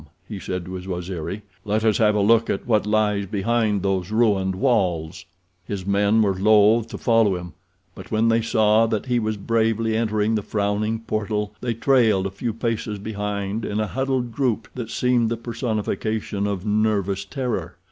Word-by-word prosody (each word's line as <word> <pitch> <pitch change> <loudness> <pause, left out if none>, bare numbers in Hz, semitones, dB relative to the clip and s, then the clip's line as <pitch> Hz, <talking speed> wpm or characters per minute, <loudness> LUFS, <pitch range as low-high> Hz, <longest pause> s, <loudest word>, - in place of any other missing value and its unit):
he 105 -3 -6
said, 90 -2 -4
to 95 - -7
his 90 0 -7
Waziri. 90 +2 -4 0.2
"Let 105 +1 0
us 110 -2 +3
have 105 -2 +4
a 105 - +2
look 115 +2 +4
at - - -2
what 105 -3 +1
lies 105 -2 +1
behind 105 0 0
those 95 -2 -1
ruined 105 -4 +2
walls." 90 - 0 0.4
His 95 0 -5
men 100 +2 +3
were 100 -2 +2
loath 105 +3 +4
to - - -7
follow 115 -5 +3
him, 90 -1 -7 0.4
but - - -11
when 110 +1 +2
they 115 0 +3
saw 110 0 +3
that 110 0 -2
he 125 -2 +1
was 110 -1 -2
bravely 115 +1 0
entering 110 -1 +1
the 110 - +1
frowning 105 +2 -1
portal 105 -1 -2
they 120 -2 -2
trailed 115 -6 +3
a 95 - -2
few 115 +5 -3
paces 110 -2 -3
behind 105 0 -3
in 105 - -2
a 110 - +1
huddled 130 +1 -2
group 115 -4 -1
that 120 -3 -6
seemed 125 -2 +1
the 115 - -2
personification 110 -3 -2
of 100 -1 -3
nervous 105 -2 +1
terror. 100 - -4
105 Hz, 180 wpm, -23 LUFS, 100-115 Hz, 0.4 s, have